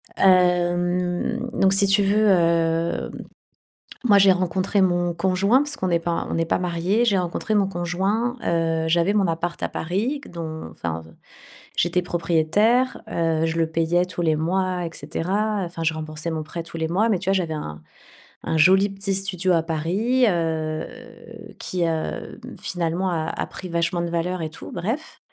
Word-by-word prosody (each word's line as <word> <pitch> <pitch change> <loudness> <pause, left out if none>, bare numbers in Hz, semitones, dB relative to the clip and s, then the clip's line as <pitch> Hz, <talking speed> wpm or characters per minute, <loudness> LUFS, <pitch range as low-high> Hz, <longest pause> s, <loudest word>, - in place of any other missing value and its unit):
Hem, 180 +4 +2
donc 195 0 +3
si 200 +1 +5
tu 195 +1 +4
veux, 210 +2 +3
hem, 165 -2 +2 0.9
moi, 205 -4 +5
j'ai 195 -1 +7
rencontré 185 +2 +1
mon 175 -2 +2
conjoint, 190 +7 +2
parce 290 +1 -3
qu'on 185 - -1
est 170 - +3
pas 170 0 -2
on - - -1
est 165 - +1
pas - - +1
mariés. 180 +6 0
J'ai 200 -5 +3
rencontré 180 +5 -2
mon 200 -2 +3
conjoint, 195 +7 -1
heu, 165 -1 0
j'avais 170 +4 +2
mon 200 -3 +2
appart 170 +1 -3
à - - -1
Paris 215 - -2
q - - -13
dont 160 - -6
enfin, 80 0 -4 0.7
j'étais 175 +1 +2
propriétaire, 175 +9 +1
heu, 165 -4 0
je 165 0 -2
le 165 -1 +2
payais 165 +2 +1
tous 175 -1 -5
les 160 -2 +2
mois 180 +3 -1
et - - -3
cetera, 195 +7 -1
enfin 170 -1 -6
je 160 0 +1
remboursais 155 +1 -5
mon 155 -1 -3
prêt 165 +2 -6
tous 165 0 -9
les 160 0 -1
mois, 200 +7 +1
mais 200 -5 +2
tu 195 +1 -3
vois - - +4
j'avais 175 -4 0
un 75 - -6 0.6
un 160 - -1
joli 190 +5 +5
petit 195 0 -2
studio 185 -2 0
à 165 -2 +2
Paris, 190 +11 +1
heu, 160 -2 -1 0.7
qui, 180 -1 -2
heu, 160 +6 -3 0.2
finalement 175 +1 -1
a 160 -3 -1
a - - -2
pris 185 - -9
vachement 170 +1 0
de 170 - -2
valeur 175 +1 -1
et 155 - -3
tout, - - -10
bref. 225 - -4
175 Hz, 180 wpm, -23 LUFS, 165-195 Hz, 0.9 s, j'ai